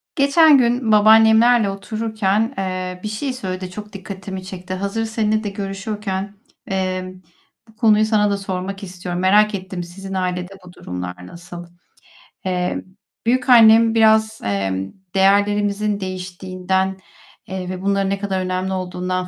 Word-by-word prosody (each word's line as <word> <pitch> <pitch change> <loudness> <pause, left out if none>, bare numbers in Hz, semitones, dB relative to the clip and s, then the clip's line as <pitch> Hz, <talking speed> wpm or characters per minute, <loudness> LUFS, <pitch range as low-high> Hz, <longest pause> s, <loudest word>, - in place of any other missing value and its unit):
Geçen 285 +1 +6
gün 240 -2 +1
babaannemlerle 220 +1 +6
otururken, 215 +2 -1
eee, 185 -1 -3
bir - - -3
şey 235 +6 -3
söyledi. 185 -6 -5
Çok 210 +2 -9
dikkatimi 190 -1 -7
çekti. 185 -1 -7
Hazır 200 +4 -2
seninle 215 0 0
de 205 - -2
görüşüyorken, 200 0 -4 0.4
eee, 185 -1 -2 0.5
bu 220 - -21
konuyu 215 -1 +4
sana 210 -2 +2
da 200 - 0
sormak 195 +1 -5
istiyorum. 180 -1 -5
Merak 210 +3 +4
ettim 185 -2 -6
sizin 195 +3 -9
ailede 180 0 -2
bu 180 - -13
durumlar 90 - -7
nasıl? 175 0 -10 0.8
Eee, 180 -1 -1 0.4
büyükannem 230 -2 +6
biraz, 220 0 +3
emm, 95 -1 -2 0.2
değerlerimizin 205 +1 +2
değiştiğinden, 185 0 -3 0.5
eee, 185 -1 -5
ve 185 0 -5
bunların 195 0 0
ne 195 - -1
kadar 195 -2 -2
önemli 185 +1 -2
olduğundan 185 0 -3
195 Hz, 130 wpm, -20 LUFS, 185-215 Hz, 0.8 s, Geçen